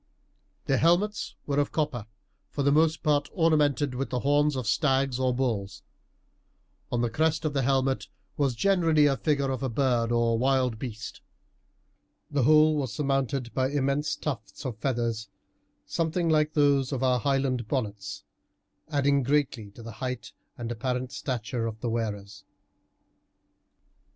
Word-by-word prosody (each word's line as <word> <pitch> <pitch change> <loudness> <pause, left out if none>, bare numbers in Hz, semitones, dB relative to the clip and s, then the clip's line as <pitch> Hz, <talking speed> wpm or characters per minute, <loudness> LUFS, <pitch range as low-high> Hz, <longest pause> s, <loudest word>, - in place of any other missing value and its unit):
Their 135 - +2
helmets 190 +6 +1
were 145 -1 0
of 145 - 0
copper, 140 -8 -2 0.4
for 140 - -2
the 140 - +3
most 155 +1 +3
part 145 -1 +2
ornamented 150 -5 +2
with 135 +2 -3
the 125 -1 -2
horns 145 +1 +2
of 130 -2 -3
stags 135 +1 +1
or 130 -1 +2
bulls. 120 -6 -2 1.1
On 120 - 0
the 120 - +1
crest 160 +4 +1
of 150 - 0
the 135 - +1
helmet 135 0 +1 0.3
was 140 -4 0
generally 165 - +3
the 140 -2 +3
figure 140 -2 0
of 130 - -3
a 135 - -1
bird 120 -2 +1
or 115 -1 +2
wild 130 -3 +1
beast. 110 -4 -7 1.1
The 145 -2 +1
whole 155 +3 +5
was 135 -5 -2
surmounted 135 -1 -1
by 130 0 +1
immense 145 +1 0
tufts 125 -3 -6
of 120 -5 -4
feathers, 115 -4 -2 0.6
something 165 +1 -1
like 155 -1 +2
those 140 -3 +3
of 135 -2 -2
our 125 -1 +3
Highland 135 -2 0
bonnets, 105 -6 -3 0.7
adding 140 -2 +2
greatly 135 -5 0
to 115 +3 -13
the 115 - -7
height 125 -1 -4 0.3
and 120 -2 -5
apparent 125 +2 -2
stature 120 -2 -3
of 110 -1 -6
the 120 0 -2
wearers. 105 -3 -4
135 Hz, 150 wpm, -27 LUFS, 120-145 Hz, 1.1 s, whole